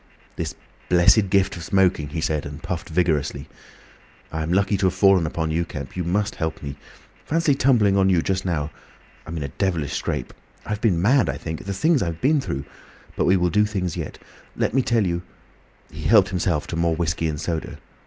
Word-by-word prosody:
"This - - -4 0.3
blessed 90 +3 +5
gift 95 0 +2
of 85 - -7
smoking!" 90 -5 +2
he 80 +2 -4
said, 75 -2 0
and 70 +2 -8
puffed 85 -1 -4
vigorously. 80 -4 0 0.8
"I'm 80 +1 -2
lucky 100 +2 +2
to 95 - +2
have 95 - -1
fallen 95 -3 +4
upon 80 0 -2
you, 85 +2 +1
Kemp. 70 -5 -7
You 90 - -2
must 100 +5 0
help 80 -1 -3
me. 70 -1 -5 0.5
Fancy 165 -1 +2
tumbling 120 -7 +3
on 95 0 +4
you 85 -4 +3
just 95 0 -1
now! 80 -4 -2 0.6
I'm 85 +1 -5
in 75 - -3
a 70 - -4
devilish 85 -3 -1
scrape—I've 105 0 -5
been 95 -8 +2
mad, 120 - +3
I 70 - -2
think. 80 +2 -6
The 100 - -3
things 160 - +2
I 95 - 0
have 85 0 -4
been 145 +2 +3
through! 70 - -4 0.5
But - - +1
we 95 +2 +4
will 90 -1 +1
do 105 +1 +3
things 95 -5 -2
yet. - - -5 0.4
Let - - 0
me 135 - +4
tell 115 -4 +1
you—" 85 -1 -1 0.7
He 75 - -8
helped 105 -4 +5
himself 90 -4 0
to - - -4
more 85 -1 +1
whiskey 85 0 -1
and 75 -1 -3
soda. 85 0 -3
90 Hz, 205 wpm, -23 LUFS, 80-100 Hz, 0.8 s, blessed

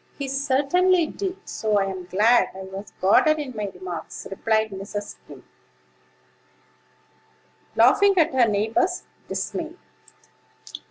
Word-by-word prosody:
"He 280 - -4
certainly 290 +7 +2
did; 380 +3 -4
so 215 -2 0
I'm 190 -2 -3
glad 215 +7 +3
I 190 - -7
was 190 +2 -9
guarded 310 +11 +4
in 280 -5 -6
my 210 -1 -3
remarks," 180 -2 -7
replied 220 +2 0
Mrs. 200 +2 -5
Skim, - - -14 2.3
laughing 400 -1 +5
at 320 -3 +3
her 250 -3 +4
neighbor's 225 - 0 0.2
dismay. 330 -1 -4
230 Hz, 110 wpm, -24 LUFS, 200-315 Hz, 2.3 s, laughing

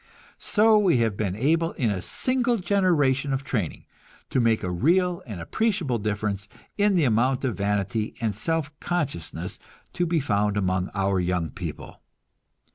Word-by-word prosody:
So 215 0 +4
we 185 -9 +3
have 115 -3 +1
been 100 -3 -2
able, 165 +8 +1
in 115 -6 0
a 95 -3 -2
single 245 - 0
generation 165 -9 +2
of 135 +1 -2
training, 105 - -3 0.5
to - - +2
make 115 -2 +2
a 90 - -2
real 175 - +2
and 105 -6 -6
appreciable 170 - 0
difference 105 -1 -2 0.3
in 205 -1 +3
the 170 - +3
amount 125 +2 +2
of 120 -6 -1
vanity 100 +2 -1
and 110 -4 -1
self 160 +5 -1
consciousness 90 - -3 0.3
to 175 0 0
be 165 0 +1
found 105 -6 0
among 95 -1 0
our 95 -1 +1
young 90 -3 -1
people. - - -7
120 Hz, 155 wpm, -25 LUFS, -, 0.5 s, So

